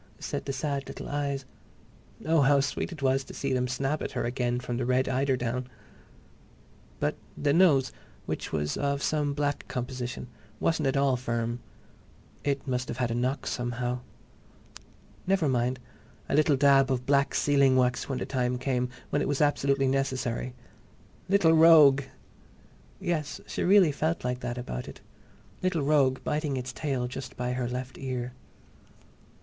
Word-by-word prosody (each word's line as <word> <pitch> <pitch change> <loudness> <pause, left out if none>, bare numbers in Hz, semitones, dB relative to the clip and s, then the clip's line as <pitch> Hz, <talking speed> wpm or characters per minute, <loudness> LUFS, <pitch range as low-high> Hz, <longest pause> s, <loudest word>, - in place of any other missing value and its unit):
said - - -4
the 140 - -2
sad 140 -1 -3
little - - -7
eyes. 140 -2 -2 0.8
Oh, 160 -1 +4
how 140 +1 +5
sweet 140 +6 -2
it 155 -5 -8
was 135 0 +2
to - - -10
see 135 -1 -1
them 125 0 +1
snap 135 +4 -1
at - - -4
her 125 - -1
again 120 0 -1
from 120 -1 -4
the 125 - -1
red 130 +1 +2
eiderdown!... 130 -2 0 1.3
But - - -1 0.2
the 145 -1 +1
nose, 150 -7 +4 0.3
which - - -4
was 75 -1 -1
of 140 0 -1
some 145 -2 0
black 145 -1 -1
composition, 125 0 -4 0.3
wasn't 160 -3 +1
at 135 +1 +1
all 140 -2 +3
firm. 120 -1 -2 0.8
It 140 0 -1
must 125 -1 -1
have - - -5
had 125 -2 0
a - - 0
knock, 125 +4 -1
somehow. 120 0 -2 1.3
Never 190 -5 +2
mind—a 125 -1 -4
little 150 0 +4
dab 135 -1 +5
of 125 -1 -1
black 140 0 +2
sealing 140 -2 +4
wax 125 0 +1
when 135 - -1
the - - -3
time 125 -2 -1
came—when 130 +2 -2
it - - 0
was 145 -1 0
absolutely 140 -2 +2
necessary.... 130 -2 -1 0.7
Little 185 -5 +5
rogue! 160 -4 +7 1.0
Yes, 155 -4 -2
she - - -4
really 185 -3 +5
felt 160 +4 -1
like 125 0 -2
that 120 -1 -4
about 60 - -5
it. - - -10 0.6
Little 180 -5 0
rogue 140 -3 +3
biting 150 -2 -1
its 125 0 -5
tail 130 -4 -2
just 130 +2 -7
by 125 0 -2
her 125 -1 -2
left 125 +1 -5
ear. 125 -2 -4
135 Hz, 155 wpm, -28 LUFS, 125-145 Hz, 1.3 s, rogue